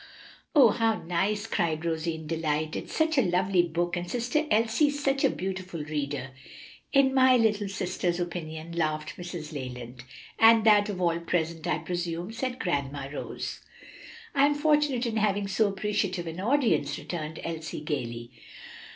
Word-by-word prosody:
'" - - -25
"Oh, 265 -6 +8
how 225 -1 0
nice!" 195 +5 0
cried 165 -7 -1
Rosie 165 0 -1
in 160 -1 -9
delight; 155 -1 -1
"it's - - -5
such 315 -2 +2
a - - +6
lovely 185 -1 +2
book, 175 +1 -1
and 175 0 -4
sister 250 - 0
Elsie's 230 +7 +2
such 275 0 +1
a - - +5
beautiful 185 -3 -4
reader." 145 -3 -3 0.6
"In 275 -1 +4
my 260 -1 +6
little 210 -3 +1
sister's 180 -2 -2
opinion," 170 -2 -5
laughed 155 -2 -2
Mrs. 175 -3 -6
Leland. 125 -3 -7 0.4
"And 225 0 +7
that 210 -1 +5
of 195 -3 -4
all 170 -2 +1
present, 170 -1 -2
I - - +1
presume," 175 +1 -3
said 255 +2 -3
"Grandma 140 - -2
Rose." - - -5 0.7
"I 280 0 +5
am 290 - +1
fortunate 295 -4 +2
in 225 -2 -1
having 205 -1 +1
so 205 +2 +2
appreciative 195 -2 -1
an 165 +1 -6
audience," 220 - +1
returned 160 -2 -5
Elsie 160 -2 -5
gayly. 120 -6 -4
180 Hz, 160 wpm, -28 LUFS, 160-225 Hz, 0.7 s, Oh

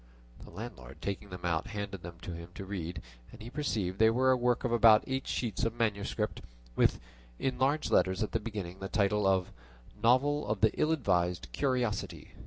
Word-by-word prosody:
The - - -12
landlord - - -9
taking 100 +1 -4
them 90 -1 -7
out 85 +3 0
handed 100 -4 -5
them 85 0 -9
to 90 - -5
him 85 +1 -8
to 100 - -6
read, 90 -4 -5 0.3
and - - -13
he 115 +2 -9
perceived 105 -11 -2
they 110 0 +7
were 130 +3 +3
a - - +5
work 125 -1 +1
of 125 - 0
about 115 -2 +7
eight 130 0 -3
sheets 115 -6 -2
of 115 0 0
manuscript, 105 -4 -1 0.3
with, - - +3 0.4
in 130 -2 -2
large 140 +4 +1
letters 95 +2 +3
at 105 - -3
the 115 - 0
beginning, 105 -5 -6
the 95 - -5
title 105 -1 +2
of 95 -2 +2 0.5
"Novel 140 +5 +3
of 105 -1 -1
the 110 -1 +5
Ill 155 - +1
advised 90 - +1
Curiosity." 120 - -1
105 Hz, 195 wpm, -31 LUFS, 95-120 Hz, 0.5 s, they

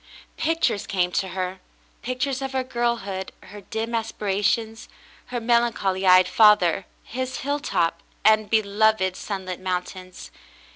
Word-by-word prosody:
Pictures 325 -10 0
came 180 -2 0
to 190 - -1
her 185 0 -4 0.2
— - - -35
pictures 260 +2 -2
of 270 0 -4
her 260 -1 0
girlhood 235 -6 -2
— - - -37
her 205 - -9
dim 220 +4 -4
aspirations 220 0 -1 0.2
— - - -26
her 245 0 -3
melancholy 225 -5 +1
eyed 185 0 +7
father 205 -5 +4
— - - -36
his 255 +2 -4
hilltop 270 - -1
— - - -35
and 215 -1 +4
beloved, 215 -3 +2
sunlit 190 -3 -5
mountains. 185 0 -5
210 Hz, 145 wpm, -24 LUFS, 185-235 Hz, 0.2 s, eyed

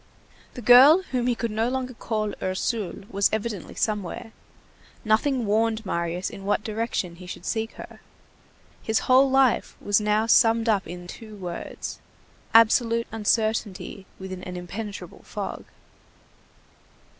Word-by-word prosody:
The 245 - -7
girl 270 - +8
whom 250 -2 0
he 245 - +2
could 230 -1 -3
no 220 +2 0
longer 255 0 -3
call 215 -2 -3
Ursule 190 +2 -2
was 200 0 +2
evidently 215 -3 -4
somewhere; 210 +1 -2 0.7
nothing 235 +3 +2
warned 220 +1 +1
Marius 170 0 -2
in 195 -2 -10
what 205 +1 0
direction 215 -5 -3
he 180 0 -11
should 180 - -8
seek 225 -1 -2
her. - - -11 0.8
His 220 0 0
whole 260 +2 +5
life 265 -2 +2
was 205 +1 +2
now 210 +1 +2
summed 230 0 +4
up 205 -4 +1
in 175 0 -8
two 215 +4 -10
words; 180 -4 -6 0.5
absolute 230 +1 +4
uncertainty 215 -3 -1
within 190 -1 -7
an 180 -1 -6
impenetrable 200 +4 -7
fog. - - -6
220 Hz, 135 wpm, -25 LUFS, 195-230 Hz, 0.8 s, girl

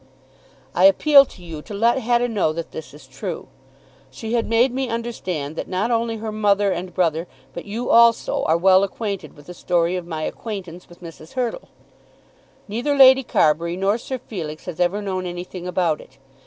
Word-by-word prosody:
I 180 - +4
appeal 275 +9 +7
to 180 - -16
you 165 -3 -7
to 205 - -9
let 235 +5 +2
Hetta 240 0 +1
know 205 -9 0
that 165 0 -6
this 160 - -8
is 145 -1 -14
true. 130 +1 -7 0.6
She 220 - -6
had 235 -1 0
made 235 +3 +3
me 265 -1 -2
understand 185 -11 -4
that - - -5
not 195 +6 -1
only 230 -1 0
her 220 0 -5
mother 205 -2 +2
and 180 0 -4
brother, 170 -1 0 0.3
but 170 - -7
you 225 +4 -3
also, 235 0 +4
are 160 +1 +3
well 185 +2 +5
acquainted 200 0 -4
with 145 - -15
the 180 - -9
story 175 0 0
of 180 -2 -5
my 160 -2 -4
acquaintance 185 -5 -6
with 175 +1 -16
Mrs. 165 -1 -11
Hurtle. 255 - -3 1.0
Neither 240 +8 -1
Lady 265 0 +8
Carbury 170 - +1
nor 200 +4 +1
Sir 260 +2 -5
Felix 165 -11 -7
has 180 -3 -7
ever 185 +4 +1
known 185 -2 -3
anything 175 +1 -7
about 175 -4 0
it. 130 - -18
190 Hz, 185 wpm, -21 LUFS, 170-230 Hz, 1.0 s, Lady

